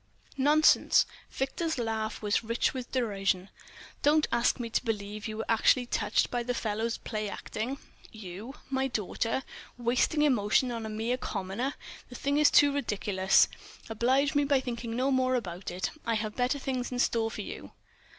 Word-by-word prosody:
"Nonsense!" 295 +3 +5 0.2
Victor's 315 +4 -2
laugh 220 -2 -2
was 210 +2 +1
rich 230 +1 0
with 255 -2 -6
derision. 195 -6 0 0.5
"Don't 305 +1 +4
ask 235 +2 +2
me 240 - -3
to 230 - -1
believe 210 -2 -3
you 215 -1 -5
were 220 - -3
actually 240 +2 +3
touched - - 0
by 245 - 0
the 245 +1 -2
fellow's 225 +1 -1
play 215 -2 -4
acting. 245 +6 -4 0.3
You—my 230 +7 -5
daughter—wasting 245 - -1
emotion 245 -2 +3
on 230 -2 -4
a - - -5
mere 225 +3 -1
commoner! 210 +5 -3 0.3
The 250 - -10
thing 280 +3 0
is 300 - +6
too 285 -1 +5
ridiculous. 200 -7 +2 0.4
Oblige 260 +5 +2
me 290 0 +3
by 280 -1 +3
thinking 235 -2 -4
no 260 +3 +1
more 255 -1 +2
about 185 -6 -4
it. 180 +1 -3
I 230 -1 0
have 215 -1 -3
better 250 +3 +1
things 260 -2 -3
in 250 - -3
store 230 -2 +1
for - - -6
you." - - -8
235 Hz, 160 wpm, -29 LUFS, 215-265 Hz, 0.5 s, is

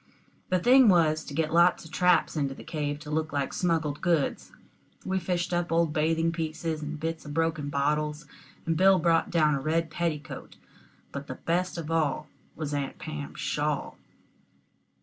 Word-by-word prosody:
The 185 - +3
thing 250 +5 +6
was 160 -4 +3
to 145 - -8
get 155 0 0
lots 170 0 +4
of 160 - -12
traps 170 -2 +3
into 140 -3 -1
the - - -11
cave 150 -3 -3
to 150 -1 -8
look 155 0 -1
like 140 -1 -2
smuggled 160 -5 0
goods. 170 -5 0 0.5
We 190 0 0
fished 180 0 -2
up 175 0 0
old 165 -2 +2
bathing 165 +2 +1
pieces 160 -1 -3
and 150 0 -5
bits 165 +1 -3
of 145 -1 -8
broken 160 -3 0
bottles, 150 +2 -1 0.4
and 165 - +1
Bill 190 +3 +6
brought 165 -2 +2
down 155 -3 +3
a 140 - -1
red 160 +2 0
petticoat; 155 -3 -4 0.6
but 140 +1 -6
the - - -5
best 180 +2 -1
of 165 -1 -5
all 155 -2 0 0.3
was 150 -2 -4
Aunt 140 -1 -3
Pam's 70 -1 -7
shawl. - - -2
160 Hz, 170 wpm, -28 LUFS, 150-170 Hz, 0.6 s, thing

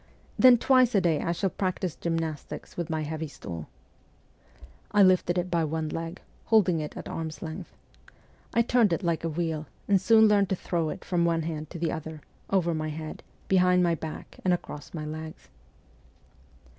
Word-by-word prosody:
Then 255 -1 +8
twice 255 -1 +4
a - - +6
day 170 -5 +1
I 170 - -1
shall 180 +2 -1
practise 185 -3 -2
gymnastics 165 -3 -4
with 170 -1 -3
my 160 -1 -1
heavy 155 +1 -4
stool.' 85 - -8 1.2
I 205 -1 +6
lifted 185 -1 +4
it 180 0 -1
by 170 -2 +2
one 155 0 -2
leg, 165 +3 -5 0.3
holding 190 -7 +4
it 150 -1 -5
at - - -7
arm's 160 -1 -5
length. 165 +2 -7 0.8
I 235 - +3
turned 230 -5 +3
it 165 - -2
like 170 -2 0
a 165 - 0
wheel, 160 -1 -2 0.2
and 195 -2 +4
soon 220 -1 +6
learned 200 -2 +3
to 190 - +1
throw 170 -3 -1
it - - -7
from 175 -2 +1
one 165 -1 +1
hand 155 -1 -4
to 175 - -7
the 165 -1 -1
other, 160 -1 -6 0.3
over 175 -3 +2
my 155 0 -2
head, 155 0 -6 0.3
behind 180 -1 +4
my 170 -1 +3
back, 160 -1 -7
and 180 -1 +3
across 150 -4 -9
my 155 -2 -5
legs. 155 - -7
170 Hz, 180 wpm, -27 LUFS, 155-185 Hz, 1.2 s, Then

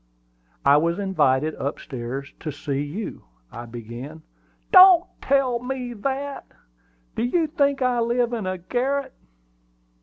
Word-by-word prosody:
"I 140 +1 +6
was 170 +3 +1
invited 155 -7 +1
up 140 - -3
stairs 130 +2 -6
to 155 - -4
see 145 -1 -3
you," 160 +10 -6 0.3
I 120 0 -8
began. 120 +7 -9 0.5
"Don't 370 -2 +9 0.2
tell 265 -3 +2
me 250 0 -4
that! 275 +5 -4 0.7
Do - - -2
you 315 +8 +1
think 280 -3 +1
I 250 -1 +1
live 240 +1 +1
in 225 -4 -3
the 185 0 -2
garret?" 260 +8 -2
220 Hz, 130 wpm, -23 LUFS, -, 0.7 s, Don't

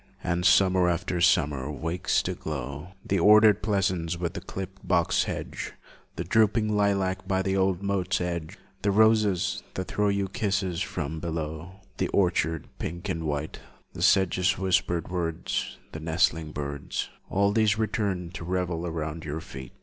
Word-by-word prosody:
And 90 +1 +1
summer 95 -1 +5
after 90 0 -1
summer 75 -6 +2
wakes 80 +4 0
to - - -2
glow 75 +4 -6
The 100 - +1
ordered 105 +2 +6
pleasance 95 -5 0
with 85 -2 -2
the - - -5
clipped 95 0 -8
box - - +2
hedge, - - -5 0.4
The - - -3
drooping 110 -1 +2
lilac 95 -2 +1
by 95 0 +1
the 95 0 0
old 95 -1 +1
moat's 95 -2 0
edge, 85 -3 -3 0.2
The 100 - +1
roses, 100 -3 +3
that 95 - -3
throw 105 0 +1
you 100 -1 0
kisses 100 -4 -1
from 80 +3 -3
below, 80 +1 -4 0.3
The - - +1
orchard 80 -5 +1
pink 85 +2 -5
and 80 0 -2
white, 75 +1 -3 0.3
The - - -7
sedge's 95 0 +3
whispered 90 -3 0
words, 85 -2 -2
The 80 - -6
nesting 80 -1 +1
birds, 70 -1 -4 0.2
All 100 +1 +2
these 110 -1 +3
return 100 -5 -1
to 95 -1 -7
revel 90 -1 -2
round 80 0 -4
your 75 +1 -4
feet. 65 -5 -9
90 Hz, 155 wpm, -27 LUFS, 80-100 Hz, 0.4 s, ordered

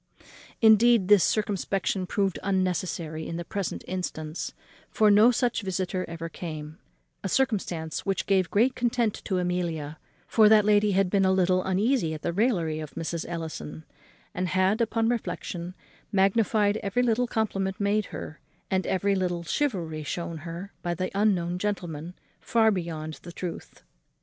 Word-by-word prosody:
Indeed, 220 -2 +6
this 205 -3 +7
circumspection 195 -2 0
proved 195 -3 0
unnecessary 180 -4 -1
in 165 - -4
the 175 - -5
present 200 +1 -4
instance, 165 -3 -4 0.4
for 215 -1 +4
no 210 +3 +7
such 245 -1 +1
visitor 185 -1 -2
ever 165 0 -5
came; 155 -2 -7 0.4
a 195 - -2
circumstance 185 -10 -1
which 195 -1 -1
gave 190 -3 +2
great 240 +6 +3
content 235 -3 0
to 190 - 0
Amelia; 170 -4 -2 0.3
for 215 -2 +5
that 215 -1 +6
lady 210 -1 +4
had 190 -1 +2
been 200 -1 +3
a 190 - +4
little 185 -1 +2
uneasy 190 -3 +1
at 155 - -10
the 170 - -1
raillery 175 -7 +1
of 155 -2 -8
Mrs. 165 0 -3
Ellison, 160 -2 -6 0.5
and 180 0 -1
had 190 +5 +2
upon 225 0 +1
reflexion 180 -6 -3 0.4
magnified 205 +1 +3
every 210 +4 0
little 245 +1 +2
compliment 195 -5 -1
made 205 +1 +1
her, 155 - -8 0.3
and 190 0 +1
every 200 +1 +1
little 180 -3 -1
civility 170 - -1
shewn 170 +2 -4
her 170 +5 -7
by 175 0 -2
the 185 +2 -3
unknown 180 -4 +1
gentleman, 175 -5 -4 0.2
far 220 -1 +3
beyond 160 -4 -4
the 175 - -9
truth. 175 0 -7
190 Hz, 150 wpm, -27 LUFS, 170-210 Hz, 0.5 s, this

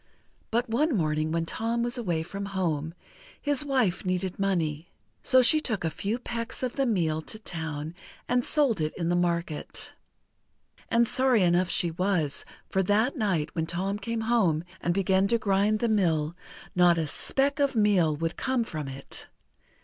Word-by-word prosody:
But 240 +3 0
one 260 +4 +1
morning 155 -2 0
when 165 0 0
Tom 230 +6 -1
was 240 0 -1
away 175 -9 -1
from 195 +4 -6
home, 160 -3 -1 0.4
his 290 -1 +1
wife 255 -10 +1
needed 185 0 -2
money. 170 -5 -1 0.3
So 260 -2 +5
she 310 +6 +6
took 220 - -1
a 160 - 0
few 200 +9 -2
pecks 235 0 -5
of 250 - -1
the 275 -2 +1
meal 165 -8 0
to 215 - -6
town 160 -6 -5 0.3
and 245 0 +2
sold 270 - +1
it 155 0 -2
in 170 -2 -1
the 175 - +2
market. 170 -3 -1 1.0
And 235 0 +3
sorry 255 -5 +4
enough 175 +1 +3
she 170 - +1
was, 175 -4 0 0.2
for 190 - +1
that 215 - +2
night, 195 - -1
when 160 -1 -2
Tom 190 +4 -2
came 230 +2 -3
home 215 -9 +2 0.2
and 175 - 0
began 190 +1 +2
to 235 +3 +3
grind 205 0 +2
the 235 - +2
mill, 170 -7 +1 0.4
not 175 -1 +5
a 160 - 0
speck 275 - +1
of 280 -2 +1
meal 195 -8 +3
would 165 +2 -3
come 260 -2 0
from 155 -9 -5
it! 135 0 -5
190 Hz, 170 wpm, -27 LUFS, 165-230 Hz, 1.0 s, she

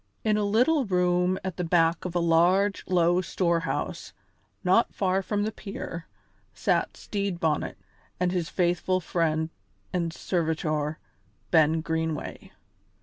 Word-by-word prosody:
In 215 -1 +2
a 210 - +1
little 250 +9 +3
room 180 -1 +2
at 190 -3 -4
the 180 - -1
back 165 0 +2
of 180 -1 -4
a - - +3
large, 175 +4 +3
low 175 0 +3
storehouse, 170 -2 -1 0.5
not 190 +5 +3
far 190 -1 +1
from 205 +1 -1
the 215 - -1
pier, 195 -5 -7 0.5
sat - - 0
Stede 200 -4 -3
Bonnet 155 -3 0 0.4
and 180 0 +1
his 175 -4 -1
faithful 180 +1 +1
friend 160 -2 0 0.4
and 170 -2 0
servitor, 155 -3 -1 0.5
Ben 160 -1 +4
Greenway. 160 -1 -3
175 Hz, 130 wpm, -27 LUFS, 165-190 Hz, 0.5 s, Ben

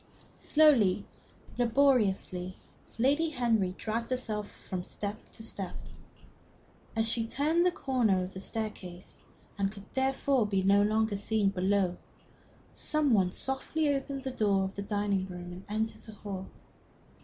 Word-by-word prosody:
Slowly, 280 -12 +4 0.5
laboriously, 225 -8 +2 0.4
Lady 285 +7 +3
Henry 225 -9 +1
dragged 230 +1 -2
herself 220 -5 -2
from 180 -1 -6
step 205 +3 -5
to 225 - -6
step. 195 -4 -4 1.2
As 225 0 +2
she 225 0 0
turned 310 +8 +2
the - - +3
corner 240 - +1
of 185 +1 -7
the 190 - -6
staircase, 190 -4 -5 0.4
and 195 0 +1
could 200 -1 -11
therefore 265 -2 +2
be 195 -2 +1
no 200 +1 +5
longer 215 0 +2
seen 205 -1 +1
from 185 -1 -2
below, 190 -3 +2 0.8
some 305 -4 +1
one 185 -4 +3
softly 285 - 0
opened 275 0 -3
the 265 - -3
door 200 -5 +2
of 190 0 -4
the 200 - -3
dining 200 -2 0
room 180 -1 -7
and 180 +2 -9
entered 220 +1 -2
the 220 - -11
hall. 195 -2 -6
215 Hz, 145 wpm, -30 LUFS, 195-255 Hz, 1.2 s, no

